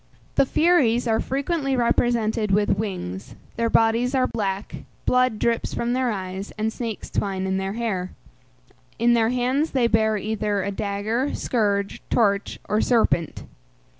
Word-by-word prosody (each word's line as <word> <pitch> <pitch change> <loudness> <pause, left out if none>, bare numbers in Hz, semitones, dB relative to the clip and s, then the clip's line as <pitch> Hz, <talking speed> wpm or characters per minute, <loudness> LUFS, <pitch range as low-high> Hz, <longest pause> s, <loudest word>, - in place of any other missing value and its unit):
The 270 - +3
Furies 255 -9 +3
are 220 -1 +2
frequently 275 0 -1
represented 235 -3 +1
with 200 0 +2
wings; 125 - -5 0.2
their 230 0 0
bodies 230 +4 +2
are 255 -1 +3
black, 200 -4 -3 0.3
blood 250 -3 +2
drips 230 +1 0
from 235 +1 -1
their 255 -1 +1
eyes, 190 0 -5
and 220 +1 -1
snakes 230 -4 -5
twine 190 -2 -2
in 190 0 0
their 190 +1 -2
hair. 210 -6 -2 0.9
In 235 +1 +3
their 225 -1 +3
hands 255 +5 +1
they 255 -3 +3
bear 220 -1 +2
either 210 -1 -1
a 200 - -2
dagger, 210 +6 -2
scourge, 200 -4 -1
torch, 200 -3 +1
or 210 - +1
serpent. 220 - +1
220 Hz, 145 wpm, -23 LUFS, 200-245 Hz, 0.9 s, The